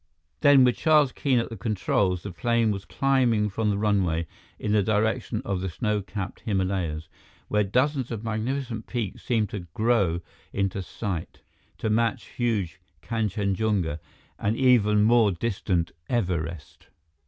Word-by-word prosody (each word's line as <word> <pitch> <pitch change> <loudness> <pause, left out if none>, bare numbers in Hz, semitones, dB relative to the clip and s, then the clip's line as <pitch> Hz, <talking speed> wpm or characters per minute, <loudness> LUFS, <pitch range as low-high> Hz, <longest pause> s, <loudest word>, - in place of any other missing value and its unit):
Then, 140 +3 +7
with 125 -1 +3
Charles 150 -4 +4
Keene 135 -1 +1
at 115 - 0
the 115 - -6
controls, 95 -3 0
the 100 - -5
plane 115 +2 +1
was 100 -1 -4
climbing 120 -6 +2
from 110 +2 0
the 100 - +1
runway 95 -6 +1 0.3
in 105 - -2
the 105 -1 +4
direction 110 +4 0
of 95 -2 -1
the 95 - -2
snow 105 +4 -1
capped 95 0 -6
Himalayas, 95 -6 -1 0.4
where 105 0 +2
dozens 130 +5 +1
of 115 -2 -5
magnificent 115 +1 -3
peaks 115 -6 -3
seemed 110 -4 0
to 90 -4 -6
grow 105 -7 +2 0.3
into 95 0 -1
sight, 90 -3 -5 0.3
to 110 - -1
match 115 0 +1
huge 105 -10 -2 0.2
Kanchenjunga 100 -6 0 0.4
and 105 +3 0
even 105 -5 +4
more 115 -1 +5
distant 90 -3 -1 0.2
Everest. 85 - -3
105 Hz, 140 wpm, -26 LUFS, 95-115 Hz, 0.4 s, Then